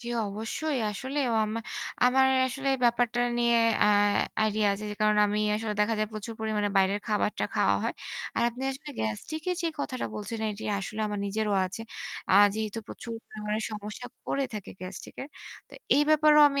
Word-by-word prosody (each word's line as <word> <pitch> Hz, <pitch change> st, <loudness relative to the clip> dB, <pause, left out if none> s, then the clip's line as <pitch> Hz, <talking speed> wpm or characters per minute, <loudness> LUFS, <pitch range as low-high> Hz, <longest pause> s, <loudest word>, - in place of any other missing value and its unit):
জি, 235 Hz, -, -10 dB, 0.2 s
অবশ্যই। 225 Hz, +8 st, -2 dB
আসলেও 265 Hz, +5 st, -2 dB
অয়ামা 220 Hz, +1 st, 0 dB, 0.4 s
আমার 265 Hz, +1 st, +5 dB, 0.2 s
আসলে 270 Hz, +2 st, -3 dB, 0.2 s
ব্যাপারটা 240 Hz, 0 st, +2 dB, 0.2 s
নিয়ে 235 Hz, 0 st, +4 dB, 0.2 s
অ্যা 210 Hz, -, +5 dB, 0.5 s
আইডিয়া 215 Hz, -1 st, +2 dB
যে -, -, -5 dB, 0.2 s
কারনে 210 Hz, 0 st, +4 dB
আমি 210 Hz, +1 st, 0 dB, 0.2 s
আসলে 215 Hz, -1 st, -3 dB
দেখা 215 Hz, +2 st, +2 dB
যায় 215 Hz, 0 st, 0 dB
প্রচুর 215 Hz, +1 st, -6 dB
পরিমাণে 215 Hz, -2 st, 0 dB
বাইরের 195 Hz, +1 st, +3 dB
খাবারটা 210 Hz, 0 st, 0 dB
খাওয়া -, -, +3 dB
হয়। -, -, -1 dB, 0.4 s
আর -, -, +2 dB
আপনি 240 Hz, +2 st, -8 dB
আসলে 270 Hz, +2 st, -8 dB
গ্যাস্ট্রিক 110 Hz, -, -3 dB
এর 360 Hz, -, -1 dB
যে 335 Hz, -, +1 dB
কথাটা 255 Hz, -2 st, -3 dB
বলছিলেন 220 Hz, +1 st, -3 dB
এটি 205 Hz, -, -8 dB
আসলে 215 Hz, +3 st, -5 dB
আমার 210 Hz, -1 st, -3 dB
নিজেরও 210 Hz, +1 st, 0 dB
আছে। 185 Hz, +4 st, -7 dB, 0.5 s
আর 200 Hz, +2 st, +8 dB
যেহেতু 220 Hz, 0 st, -3 dB
প্রচুর 235 Hz, -, -7 dB
পরিমাণে 210 Hz, 0 st, -3 dB
সমস্যা 210 Hz, +3 st, -6 dB, 0.2 s
করে 275 Hz, -, 0 dB
থাকে 210 Hz, -3 st, -6 dB
গ্যাস্ট্রিক 185 Hz, 0 st, -8 dB
এর। 275 Hz, -, -8 dB, 0.4 s
তো -, -, -26 dB, 0.2 s
এই 290 Hz, -, +5 dB
ব্যাপারেও 305 Hz, -1 st, +6 dB
আমি 280 Hz, 0 st, 0 dB
220 Hz, 175 wpm, -28 LUFS, 210-250 Hz, 0.5 s, আর